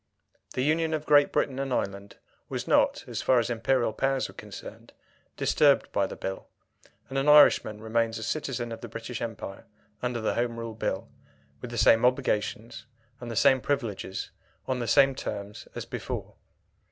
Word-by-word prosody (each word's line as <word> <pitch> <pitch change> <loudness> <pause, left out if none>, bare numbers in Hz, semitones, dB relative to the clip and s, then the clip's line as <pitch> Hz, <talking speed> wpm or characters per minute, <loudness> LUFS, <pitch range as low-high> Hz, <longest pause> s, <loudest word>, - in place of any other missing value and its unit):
The 130 - 0
union 160 +2 +1
of 155 -1 -5
Great 145 -1 +5
Britain 135 -1 0
and 135 -1 -2
Ireland 100 -3 -3 0.3
was - - -4
not, - - +3
so - - -10
far 130 - +2
as 120 0 +1
Imperial 120 0 +1
powers 135 0 0
were - - -13
concerned, - - -10 0.4
disturbed - - +3
by - - +1
the - - -7
Bill, 95 0 -5 0.6
and 135 +1 -2
an 140 +2 +2
Irishman 145 -7 +6
remains 115 0 0
a 110 - -6
citizen 125 -3 -3
of 115 - -7
the 120 - -6
British 115 +2 -6
Empire 110 -4 -6 0.3
under 125 -1 -2
the 110 - 0
Home 120 -1 -1
Rule 115 -1 -5
Bill, 110 - -3 0.5
with 125 - -6
the 120 - -6
same 115 0 +5
obligations 120 -2 0 0.3
and 120 - -7
the 115 - -5
same 130 +3 +4
privileges, 115 -9 -3 0.4
on 130 -1 -1
the 120 - -3
same 135 +3 +5
terms 100 -5 -6
as - - -5
before. - - -5
120 Hz, 175 wpm, -27 LUFS, 115-135 Hz, 0.6 s, Irishman